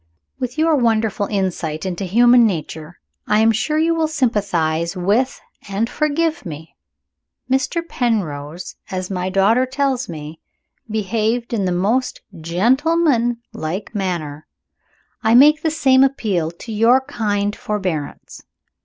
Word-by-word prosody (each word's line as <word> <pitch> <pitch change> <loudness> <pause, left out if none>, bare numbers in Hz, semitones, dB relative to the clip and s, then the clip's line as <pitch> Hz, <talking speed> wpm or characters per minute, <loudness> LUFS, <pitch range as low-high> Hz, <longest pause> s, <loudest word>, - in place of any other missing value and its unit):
With 250 +1 -4
your 320 0 +3
wonderful 225 -5 +1
insight 180 -5 -2
into 185 +1 -3
human 240 +5 +5
nature, 160 -2 -5 0.3
I 210 - +3
am 225 0 +5
sure 275 +8 -1
you 325 +1 +2
will 325 -1 +1
sympathize 190 - 0
with 210 +9 +1 0.3
and 200 +4 -1
forgive 315 +4 -1
me. 160 -3 -9 0.8
Mr. 335 +6 0
Penrose, 175 - -3
as 185 0 -4
my 185 0 -2
daughter 210 +7 +3
tells 265 -3 -1
me, 155 -1 -8 0.5
behaved 220 +3 -1
in 205 -4 0
the 180 - 0
most 215 +9 0
gentleman 240 - +1
like 170 +8 -5
manner. 170 -7 -4 0.7
I 225 +1 +3
make 295 +4 +6
the 320 - +1
same 265 -4 +4
appeal 210 - 0
to 175 +7 -10
your 230 +5 +4
kind 205 -6 -2
forbearance. 185 -8 -4
215 Hz, 125 wpm, -19 LUFS, 180-260 Hz, 0.8 s, make